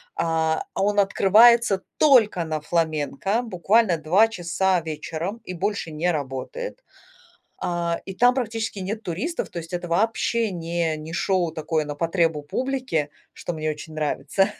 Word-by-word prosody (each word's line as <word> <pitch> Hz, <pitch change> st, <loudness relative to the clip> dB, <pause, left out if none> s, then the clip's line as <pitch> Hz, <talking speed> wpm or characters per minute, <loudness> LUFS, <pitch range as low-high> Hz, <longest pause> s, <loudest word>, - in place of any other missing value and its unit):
А, 160 Hz, -1 st, 0 dB
он 205 Hz, +1 st, +1 dB
открывается 210 Hz, +1 st, +5 dB, 0.2 s
только 225 Hz, -, +4 dB
на 155 Hz, -1 st, -3 dB
фламенко 165 Hz, -, 0 dB
буквально 205 Hz, -3 st, +2 dB
2 185 Hz, +9 st, +4 dB
часа 180 Hz, -1 st, 0 dB
вечером 165 Hz, +6 st, -5 dB
и 185 Hz, -, -6 dB
больше 195 Hz, -1 st, -2 dB
не 160 Hz, +4 st, -1 dB
работает. 160 Hz, -, -4 dB, 0.8 s
А, 170 Hz, -1 st, -1 dB
и 190 Hz, -, -7 dB
там 245 Hz, +5 st, +4 dB
практически 225 Hz, -5 st, -3 dB
нет 215 Hz, +4 st, -4 dB
туристов, 215 Hz, -, -3 dB
то 175 Hz, -, -7 dB
есть 165 Hz, +1 st, -8 dB
это 175 Hz, 0 st, -3 dB
вообще 225 Hz, +4 st, +1 dB
не 170 Hz, -2 st, -2 dB
не 155 Hz, +2 st, -8 dB
шоу 180 Hz, -2 st, +1 dB
такое 155 Hz, 0 st, -1 dB
на 145 Hz, -, -4 dB
потребу 165 Hz, -1 st, 0 dB
публике, 255 Hz, -, -2 dB, 0.2 s
что 175 Hz, -, -5 dB
мне 155 Hz, 0 st, -2 dB
очень 155 Hz, +1 st, -7 dB
нравится. 175 Hz, +6 st, 0 dB
175 Hz, 145 wpm, -24 LUFS, 160-215 Hz, 0.8 s, открывается